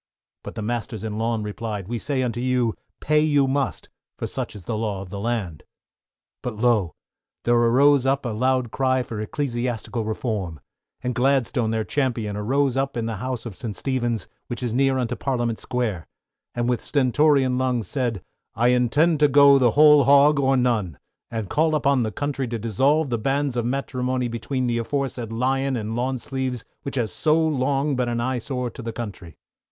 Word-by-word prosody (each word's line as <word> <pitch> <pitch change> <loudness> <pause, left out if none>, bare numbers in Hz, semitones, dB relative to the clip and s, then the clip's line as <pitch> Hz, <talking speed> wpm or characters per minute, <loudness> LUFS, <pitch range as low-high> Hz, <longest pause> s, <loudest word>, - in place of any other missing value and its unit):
But - - -8
the 110 - -4
masters 115 -1 -3
in 110 -1 -4
lawn, 115 -1 0
replied, 105 -2 -5
we 120 +1 -3
say 135 +2 0
unto 120 -1 -2
you, 125 -3 +1 0.3
pay 155 0 +3
you 145 -3 +3
must, 135 0 -1 0.3
for - - -3
such - - -4
is 100 - -10
the 110 - -3
law 105 -3 -2
of 95 - -12
the 100 - -5
land. 105 -8 -2 0.8
But 120 -3 -4
lo! 110 -6 +2 0.5
there 120 - +2
arose 125 +4 +4
up 135 0 +1
a - - -1
loud 125 +1 0
cry 130 0 +1
for 110 -3 -6
Ecclesiastical 120 -2 -3
Reform, 105 - -3 0.4
and 125 - -1
Gladstone, 125 -2 +1
their 110 0 0
Champion, 115 -6 -1
arose 130 +5 +1
up 135 -1 -1
in 115 - -1
the 115 -2 -3
house 125 +2 -4
of 110 -5 -6
St. 105 -1 -5
Stephen's, 120 +1 -1 0.2
which 120 0 -4
is 120 -3 -1
near 135 +1 +2
unto 125 -1 -1
Parliament 120 -3 -1
Square, 110 -9 -2 0.5
and 120 0 0
with 125 -1 0
stentorian 135 -1 +2
lungs, 125 -4 0
said, 120 - -2 0.3
I 120 +2 +3
intend 135 +6 +3
to 150 - +6
go 140 0 +6
the 125 0 +2
whole 150 -1 +7
hog 140 +1 +6
or 135 -1 +3
none, 110 - 0 0.3
and 110 -3 -4
call 155 - +2
upon 140 -3 +2
the 110 -2 -1
country 140 +2 -2
to 115 0 -3
dissolve 135 +7 +1
the 120 - 0
banns 135 +2 0
of 120 -1 0
matrimony 130 -1 -1
between 125 +3 -2
the 120 -1 0
aforesaid 125 -2 -3
Lion 135 +3 0
and 110 -1 -3
Lawn 130 +2 -1
Sleeves, 130 -1 -4 0.2
which 140 - -5
has 115 -7 -1
so 155 - +2
long 145 -2 +1
been 125 -1 0
an 120 0 -1
eye 125 +1 -1
sore 125 0 -3
to - - -9
the 115 0 -4
country. 100 -9 -7
125 Hz, 190 wpm, -23 LUFS, 115-135 Hz, 0.8 s, whole